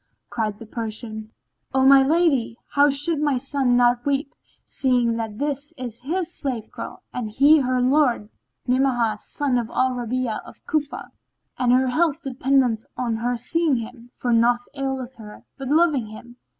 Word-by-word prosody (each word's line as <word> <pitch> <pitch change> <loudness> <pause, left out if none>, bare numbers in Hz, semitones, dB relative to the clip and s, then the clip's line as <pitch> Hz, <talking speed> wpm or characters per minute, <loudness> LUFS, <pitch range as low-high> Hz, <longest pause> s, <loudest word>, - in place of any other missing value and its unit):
Cried 215 -3 -2
the 225 - -10
Persian, 220 -1 -6 0.5
"O 265 0 +4
my 270 0 +8
lady, 275 -6 +2
how 285 +1 +4
should 290 +3 +1
my 290 -3 +2
son 265 -1 +1
not 245 0 +3
weep, 280 0 -1 0.3
seeing 245 -3 +1
that 220 -2 -4
this 290 +3 -3
is 240 -3 -7
his 345 +5 -2
slave 250 -6 -4
girl - - -8
and 240 -4 -3
he 285 +8 +5
her 255 -2 0
lord, 255 -4 +2 0.4
Ni'amah 245 -4 +1
son 270 0 -1
of 230 -1 -4
al 260 0 +1
Rabi'a 245 -2 -2
of - - -15
Cufa; 295 -3 -3 0.5
and 250 -1 +3
her 255 +1 +3
health 315 +3 +1
dependeth 260 -4 +1
on 235 -3 -1
her 245 +2 -1
seeing 320 +4 +1
him, 235 +1 -7
for 245 -1 -1
naught 240 +1 +3
aileth 265 -2 -4
her 210 -2 -12
but 270 -1 -6
loving 300 -6 +3
him. 240 +3 -12
255 Hz, 165 wpm, -23 LUFS, 235-280 Hz, 0.5 s, my